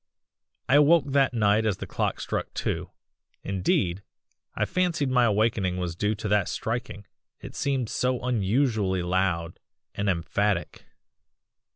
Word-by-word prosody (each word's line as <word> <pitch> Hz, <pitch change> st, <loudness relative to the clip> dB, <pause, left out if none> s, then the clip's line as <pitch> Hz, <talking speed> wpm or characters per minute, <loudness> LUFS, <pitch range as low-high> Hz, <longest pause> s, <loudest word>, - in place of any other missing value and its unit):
"I 135 Hz, -, +5 dB
awoke 150 Hz, +1 st, +5 dB
that 135 Hz, -1 st, +3 dB
night 105 Hz, 0 st, +3 dB
as 105 Hz, -4 st, 0 dB
the -, -, -6 dB
clock -, -, -2 dB
struck -, -, -3 dB
two -, -, -2 dB, 0.5 s
indeed, 95 Hz, -1 st, 0 dB, 0.5 s
I -, -, +1 dB
fancied 170 Hz, -7 st, 0 dB
my 125 Hz, -2 st, +4 dB
awakening 105 Hz, -4 st, +1 dB
was 90 Hz, -2 st, -3 dB
due 105 Hz, +4 st, 0 dB
to 105 Hz, +1 st, -5 dB
that 105 Hz, -2 st, +2 dB
striking, 115 Hz, -3 st, -4 dB, 0.3 s
it -, -, -10 dB
seemed 135 Hz, -4 st, -1 dB
so 125 Hz, +3 st, 0 dB
unusually 110 Hz, -4 st, +1 dB
loud 90 Hz, -2 st, -1 dB, 0.3 s
and 100 Hz, 0 st, -1 dB
emphatic. 95 Hz, +2 st, -1 dB
105 Hz, 135 wpm, -26 LUFS, 95-125 Hz, 0.5 s, I